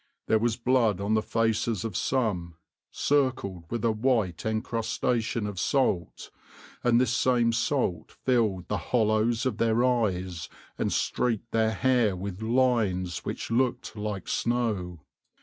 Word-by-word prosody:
There 110 - +3
was 115 0 0
blood 120 -5 +2
on 100 +2 0
the 110 - +3
faces 115 -2 0
of 110 -5 -4
some, 95 -12 -1 0.3
circled 130 -11 0
with 120 -1 -2
a 115 - +4
white 110 -6 0
encrustation 115 0 -1
of 105 -3 -4
salt, 100 - 0 0.5
and 120 -1 +4
this 125 -2 +2
same 120 -2 +2
salt 115 - -1
filled 110 -8 0
the - - -1
hollows 110 0 +2
of 130 - -1
their 115 +1 +2
eyes 95 -9 -1 0.3
and - - -1
streaked 115 -1 -1
their 110 0 +2
hair 120 -4 +2
with 95 +2 -6
lines 110 - +1
which - - -4
looked 125 -1 0
like 105 -3 -4
snow. 105 -9 -1
110 Hz, 135 wpm, -27 LUFS, 100-120 Hz, 0.5 s, a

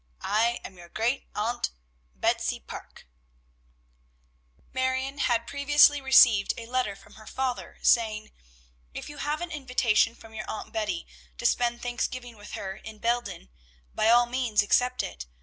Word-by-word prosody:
I 230 +3 +2
am 185 - -10
your 175 0 -13
great 235 +8 -1
aunt, 230 +3 -1 0.5
BETSY - - 0
PARKE. - - -11 1.7
Marion 260 +2 -1
had 235 -3 +1
previously 290 +2 +5
received 240 -6 +6
a 230 - -7
letter 245 -4 -1
from - - -18
her 215 0 -14
father, 260 -2 -3
saying, 215 -2 +2 0.6
"If - - -6
you 295 - -9
have 300 +2 -2
an 350 -1 -4
invitation 250 -6 +2
from 225 -1 -15
your 215 -1 -6
Aunt 215 - -6
Betty 215 - -2 0.3
to - - -6
spend 240 -1 +1
Thanksgiving 245 0 -3
with 205 -1 -12
her 190 0 -5
in 220 0 -10
Belden, 235 - -2 0.4
by 220 - +2
all 240 +1 +6
means 240 -4 +1
accept 250 +4 +2
it. - - -7
240 Hz, 150 wpm, -27 LUFS, 215-260 Hz, 1.7 s, received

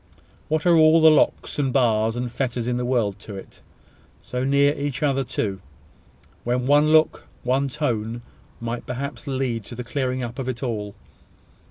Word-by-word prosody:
What 155 -1 -1
are 175 -1 +6
all 160 0 +6
the 160 0 +7
locks, 155 - +1
and 135 -2 +1
bars, 115 -4 +2
and 120 0 -3
fetters 120 -2 -2
in 125 0 0
the 125 - -2
world 110 -6 0
to 105 -1 -9
it? 95 - -11 0.6
So 125 0 -3
near 140 +1 +3
each 145 0 -3
other 135 -2 +2
too! 100 -6 -3 0.8
When 125 +1 0
one 145 +2 +4
look, 155 0 +3 0.2
one 130 +3 +1
tone, 120 -5 -2 0.4
might 115 +1 -5
perhaps 140 +4 -5
lead 130 -4 -2
to 120 - -8
the 125 - -5
clearing 130 0 -2
up 120 +2 -6
of 130 -1 -3
it 125 +1 -4
all! 105 -5 -3
125 Hz, 175 wpm, -23 LUFS, 120-140 Hz, 0.8 s, the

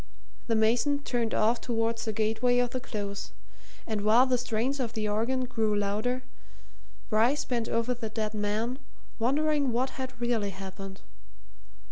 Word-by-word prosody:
The 230 - +2
mason 245 +6 +2
turned 235 -4 0
off 230 +3 +3
towards 230 -1 0
the 220 - 0
gateway 225 +3 +2
of 245 -1 +2
the 255 - -2
Close, 200 -4 -5 0.5
and 215 -3 -2
while 220 +5 +6
the 255 -1 +2
strains 245 +4 -1
of 235 -3 -2
the 215 -2 -1
organ 235 +5 0
grew 220 -3 0
louder, 215 +6 0 0.9
Bryce 235 +7 +3
bent 235 -2 -1
over 230 +2 +1
the 230 -2 -5
dead 215 -1 -2
man, 215 +5 -1 0.4
wondering 285 +3 +2
what 260 +3 -1
had 260 -1 -6
really 235 -4 +1
happened. 195 0 -8
230 Hz, 150 wpm, -29 LUFS, 215-250 Hz, 0.9 s, while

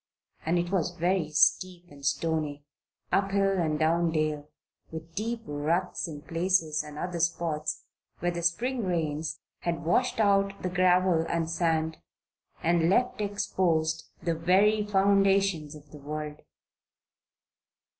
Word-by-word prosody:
And 170 +2 +2
it 175 +1 -1
was 175 -2 0
very 175 -1 +1
steep 175 +2 +2
and 140 -1 -14
stony 145 0 -1 0.5
up 195 0 +2
hill 195 -1 +1
and 155 -3 0
down 165 +2 +2
dale 155 -2 -1 0.4
with 160 0 -8
deep 225 +4 -3
ruts 165 +5 -1
in 145 -3 -8
places 165 -2 +1
and 150 -1 -10
other 175 +1 -3
spots 165 -2 -1 0.3
where 175 +1 -1
the 170 0 -4
Spring 235 +9 0
rains 160 -3 -2 0.2
had 170 -1 -3
washed 225 +9 +1
out 200 -1 +2
the 185 - 0
gravel 180 -2 +3
and 165 -1 0
sand 160 -1 0 0.7
and 170 0 +3
left 245 +2 +1
exposed 165 -6 0
the 170 - +1
very 195 +6 +3
foundations 195 -5 +2
of 145 -1 -15
the 150 - -11
world. 150 +1 -6
170 Hz, 135 wpm, -28 LUFS, 155-190 Hz, 0.7 s, gravel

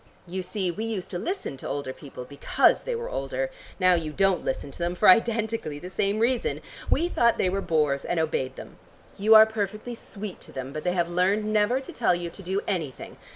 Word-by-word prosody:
You 185 +1 -4
see 185 0 -2
we 215 +6 -4
used 215 -5 -4
to 175 - -3
listen 360 - -3
to - - -7
older 140 -2 -3
people 130 -3 -10
because 140 +2 +2
they - - -3
were 470 +1 -4
older; - - -2 0.3
now 185 -1 +5
you 165 -3 -1
don't 195 +2 +2
listen 140 +1 -3
to - - -12
them, 175 +1 -1
for - - +3
identically 225 -6 +3
the 180 +5 -8
same 200 +3 0
reason. 235 +2 +1 0.3
We 335 +4 +3
thought 235 -9 +3
they 185 - +1
were 195 +1 -1
bores 150 -5 +1
and 175 - -1
obeyed 135 -5 -1
them; - - -11 0.4
you 215 +2 +6
are 220 0 +10
perfectly 215 +2 -4
sweet 210 -4 -8
to - - -9
them, 130 +1 -6
but 155 - -5
they 180 - +1
have 175 -2 +1
learned 185 +5 +1
never 215 +4 +3
to 270 - -10
tell 225 -7 +2
you 175 -1 -4
to 195 - -11
do 190 +2 -1
anything. 160 -9 -4
185 Hz, 220 wpm, -26 LUFS, 165-220 Hz, 0.4 s, are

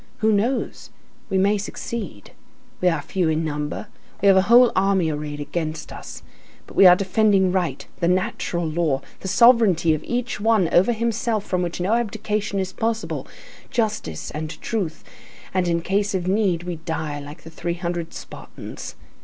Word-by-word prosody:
Who 220 0 +2
knows? 230 +6 -1 0.4
We 190 - +1
may 200 +2 +3
succeed. 200 - -6 0.5
We 180 - +3
are 165 -3 -1
few 180 -4 0
in 160 +1 0
number, 150 +4 -3 0.3
we 200 - +4
have 195 - +7
a 190 - +6
whole 245 +1 +7
army 190 -4 +2
arrayed 150 0 -5
against 155 +1 -4
us; - - -9 0.4
but - - -14
we 195 - +8
are 180 - +9
defending 195 -1 +3
right, 175 -7 -1
the 170 - +1
natural 175 -1 0
law, 155 -4 0 0.2
the - - -6
sovereignty 200 -6 +5
of 155 - -3
each 245 -1 -2
one 215 -4 +3
over 190 +7 +5
himself 230 -2 -1
from 180 -1 -1
which 175 -1 -3
no 185 +5 +1
abdication 215 -3 -1
is 190 -1 -2
possible, 225 0 -2 0.4
justice 215 - -2
and 155 +1 -5
truth, 190 -9 -3 0.5
and 185 -1 +1
in 170 -1 0
case 200 +2 0
of 180 -1 -2
need, 190 -4 +1
we 175 -1 -4
die 160 -2 -4
like 145 +3 -10
the 165 - -11
three 170 +1 -3
hundred 170 -1 -3
Spartans. - - -9
185 Hz, 170 wpm, -23 LUFS, 165-210 Hz, 0.5 s, are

